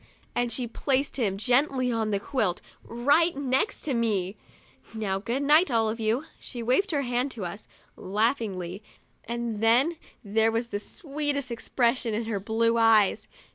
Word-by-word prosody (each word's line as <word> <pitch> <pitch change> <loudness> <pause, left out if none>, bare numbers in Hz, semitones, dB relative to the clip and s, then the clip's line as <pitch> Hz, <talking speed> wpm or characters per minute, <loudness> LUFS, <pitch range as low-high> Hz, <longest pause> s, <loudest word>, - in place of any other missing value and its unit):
and 245 -1 0
she 250 - +1
placed 270 +4 -1
him 200 -7 0
gently 255 +2 +2
on 225 -2 -1
the 200 -1 0
quilt, 205 -5 -1 0.2
right 285 +8 +2
next 270 +6 0
to 290 - -2
ME. 210 -5 0 0.3
" - - -27
Now, 195 -3 -1
good 240 +7 -2
night, 305 +4 +5
all 225 -3 +2
of 230 - -6
you!' 225 +7 0
She 240 -3 -7
waved 260 - +2
her 285 -4 0
hand 250 +2 0
to 205 -6 -5
us, 200 +5 -7 0.3
laughingly, 200 -3 -1 0.4
and 235 -2 -3
then 250 +9 +3 0.3
there 220 +2 +2
was 230 +1 -2
the 205 - -3
sweetest 285 - -2
expression 235 -1 0
in 225 +1 -2
her 220 -3 -2
blue 230 +3 +1
eyes. 220 -3 +4
235 Hz, 165 wpm, -27 LUFS, 220-265 Hz, 0.4 s, night